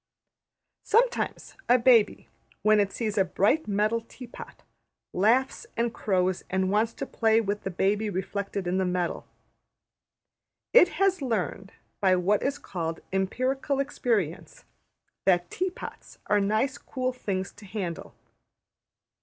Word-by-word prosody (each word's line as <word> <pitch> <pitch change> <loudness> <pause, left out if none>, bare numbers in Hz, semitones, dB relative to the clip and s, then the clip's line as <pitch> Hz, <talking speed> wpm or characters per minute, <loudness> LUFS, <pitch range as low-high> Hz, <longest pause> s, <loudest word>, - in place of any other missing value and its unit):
Sometimes 480 +3 +1 0.2
a 245 - +7
baby, 235 -3 +4 0.4
when 215 0 +5
it 200 -1 +1
sees 215 -3 -2
a - - +6
bright 205 - +1
metal 210 +3 +1
tea 250 +2 -12
pot, 240 - -12 0.5
laughs 235 +8 +2
and 235 0 0
crows 185 -2 0
and 190 0 0
wants 220 +2 +2
to - - -5
play 225 -3 +2
with 210 -2 -2
the - - -4
baby 205 +4 0
reflected 200 +1 -3
in 180 +2 0
the - - +2
metal. 180 -1 -2 1.5
It 475 -7 +8
has 390 -3 +2
learned, 200 -5 -2 0.3
by 190 -3 +4
what 190 +3 +2
is 280 +1 -1
called 165 -3 -5
``empirical 255 +8 0
experience,'' 230 - -2 0.6
that 175 -2 +2
tea 370 +2 -1
pots 365 - -10
are 210 - +3
nice 215 +7 0
cool 255 -1 -3
things 195 -6 -3
to 205 - -15
handle. 185 -4 -5
210 Hz, 135 wpm, -27 LUFS, 190-250 Hz, 1.5 s, It